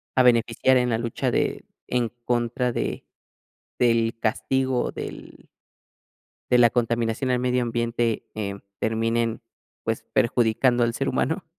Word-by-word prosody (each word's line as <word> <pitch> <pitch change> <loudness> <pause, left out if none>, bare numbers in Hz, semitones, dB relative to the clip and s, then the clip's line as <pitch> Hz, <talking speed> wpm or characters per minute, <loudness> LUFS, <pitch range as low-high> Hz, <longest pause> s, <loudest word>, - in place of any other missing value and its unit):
a 130 - +5
beneficiar 120 +1 +4
en 125 0 +1
la 115 - +2
lucha 115 0 -2
de - - -1 0.2
en 120 -2 0 0.2
contra 120 +1 0
de - - -3 0.7
del 115 -2 +2
castigo 130 +3 0
del - - -9 1.0
de 125 - +6
la 120 -1 +6
contaminación 120 +1 0
al 125 - +2
medio 125 0 +1
ambiente, 115 -1 -1
em, 100 -2 -4 0.2
terminen, 115 +1 0 0.4
pues, - - -2
perjudicando 120 +1 +3
al 115 0 +1
ser 135 +2 -2
humano? 160 +8 -1
120 Hz, 130 wpm, -24 LUFS, 115-125 Hz, 1.0 s, de